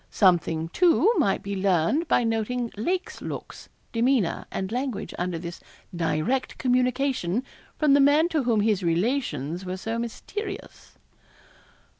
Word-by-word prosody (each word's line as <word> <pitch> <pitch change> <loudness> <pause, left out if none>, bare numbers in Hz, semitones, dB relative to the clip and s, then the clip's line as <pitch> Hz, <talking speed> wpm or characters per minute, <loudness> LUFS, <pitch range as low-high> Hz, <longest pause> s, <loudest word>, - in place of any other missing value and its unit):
Something, 170 -4 +2
too, 360 - +4
might 195 - +1
be 200 0 -3
learned 190 - +1
by 245 - +3
noting 230 +1 -1
Lake's 370 - -2
looks, - - -7 0.2
demeanour, 235 -5 +1
and 190 +1 -4
language 245 -4 -3
under 180 -1 -1
this 170 +1 -7 0.4
direct 170 +10 -1
communication 250 -4 +1 0.3
from 300 -3 +4
the 285 - +6
man 290 +4 +5
to 315 -4 +1
whom 235 -4 +2
his 210 -2 +2
relations 170 - -1
were 185 0 -4
so 225 +4 -3
mysterious. 390 - -6
230 Hz, 130 wpm, -25 LUFS, 180-275 Hz, 0.4 s, the